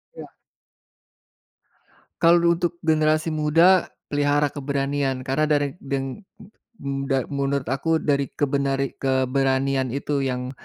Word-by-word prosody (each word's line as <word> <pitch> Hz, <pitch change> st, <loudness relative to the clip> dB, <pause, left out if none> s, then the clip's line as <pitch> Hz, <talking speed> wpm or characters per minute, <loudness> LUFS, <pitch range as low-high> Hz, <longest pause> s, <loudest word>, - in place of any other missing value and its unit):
Iya. -, -, -11 dB, 1.9 s
Kalau 170 Hz, 0 st, +5 dB
untuk 170 Hz, 0 st, -2 dB
generasi 155 Hz, 0 st, +2 dB
muda, 165 Hz, +5 st, +4 dB, 0.2 s
pelihara 145 Hz, 0 st, +2 dB
keberanian 140 Hz, -2 st, -2 dB
karena 140 Hz, +3 st, +1 dB
dari 145 Hz, -1 st, +2 dB
deng 135 Hz, +5 st, -4 dB, 0.2 s
m 205 Hz, -, -16 dB, 0.3 s
muda 135 Hz, -1 st, -1 dB
menurut 140 Hz, -1 st, -1 dB
aku 160 Hz, +5 st, 0 dB
dari 140 Hz, -2 st, +1 dB
kebenari 140 Hz, -1 st, -1 dB
keberanian 130 Hz, 0 st, +1 dB
itu 140 Hz, 0 st, -2 dB
yang 125 Hz, -1 st, -3 dB
140 Hz, 105 wpm, -23 LUFS, 135-155 Hz, 1.9 s, Kalau